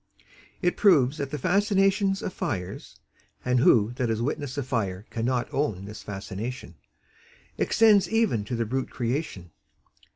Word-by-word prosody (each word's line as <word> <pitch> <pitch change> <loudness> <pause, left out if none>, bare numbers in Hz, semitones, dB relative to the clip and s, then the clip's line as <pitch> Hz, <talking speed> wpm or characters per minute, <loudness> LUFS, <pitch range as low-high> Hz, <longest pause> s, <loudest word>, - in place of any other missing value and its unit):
It 175 - +1
proves 150 -9 +4
that 140 -1 -3
the 150 - -4
fascinations 195 - +2
of 185 - -4
fires 90 -1 -5 0.5
(and 125 0 +2
who 110 -2 +4
that 125 -2 0
has 110 -1 0
witnessed 140 +2 -3
a 140 - -1
fire 105 -7 -2
cannot 120 +1 -1
own 110 -10 -1
this 105 +1 -9
fascination?) 100 +2 -6 0.9
extends 210 -5 +4
even 220 - +1
to 120 - -3
the 115 0 -1
brute 130 +4 -2
creation. 120 - -3
125 Hz, 140 wpm, -26 LUFS, 110-180 Hz, 0.9 s, proves